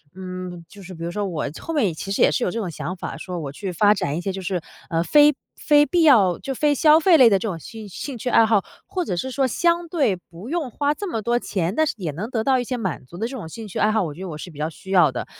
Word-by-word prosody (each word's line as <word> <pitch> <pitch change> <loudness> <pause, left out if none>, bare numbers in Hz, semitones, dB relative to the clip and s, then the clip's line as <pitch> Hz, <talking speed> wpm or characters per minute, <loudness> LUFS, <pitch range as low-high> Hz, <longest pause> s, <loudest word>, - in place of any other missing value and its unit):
嗯， 185 -2 -7
就 205 - -14
是 185 0 -10
比 165 - -8
如 170 - -3
说 205 +2 -2
我 160 -6 -3
后 330 - -5
面 285 -8 +3
也 180 - 0
其 195 +5 -6
实 - - +2
也 - - +5
是 - - 0
有 - - +1
这 230 - -3
种 185 -6 -3
想 180 +4 -5
法， - - -6
说 180 -2 -5
我 145 -4 -5
去 185 +6 -5
发 205 +4 +4
展 180 -7 -2
一 175 - -3
些， 195 - -2
就 190 0 -6
是， 180 -2 -2 0.3
呃， 165 -1 +1
非 295 +7 +5 0.2
非 295 -1 +4
必 350 +1 +1
要 210 - +5
就 270 - -4
非 295 +2 +2
消 305 +2 +5
费 355 +1 +5
类 255 -5 +8
的 200 - +4
这 220 - -3
种 180 - -3
兴 220 +4 -9
兴 260 +7 -6
趣 245 - -3
爱 225 - +5
好， 215 -3 +2 0.2
或 365 -2 -2
者 180 - -2
是 260 +10 -3
说， 270 +1 +1
相 340 +6 +1
对 290 - +1
不 180 +5 -12
用 320 -5 -2
花 290 +4 0
这 405 - -5
么 225 - -2
多 240 +3 +1
钱， 185 -4 -2
但 315 - +3
是 - - -1
也 170 -6 -3
能 190 +10 -5
得 225 -4 -1
到 260 0 +3
一 - - -1
些 250 +1 -3
满 190 - -4
足 170 +7 -12
的 225 +5 -2
这 260 +1 -7
种 165 - -7
兴 220 +6 -8
趣 190 - -7
爱 215 - +3
好， 220 -2 +1
我 155 -4 -4
觉 180 - -10
得 190 - -5
我 150 - -6
是 175 - -8
比 150 - -15
较 155 - -1
需 180 +4 -14
要 175 -7 +5
的。 - - -4
205 Hz, 335 characters per minute, -22 LUFS, 175-260 Hz, 0.3 s, 类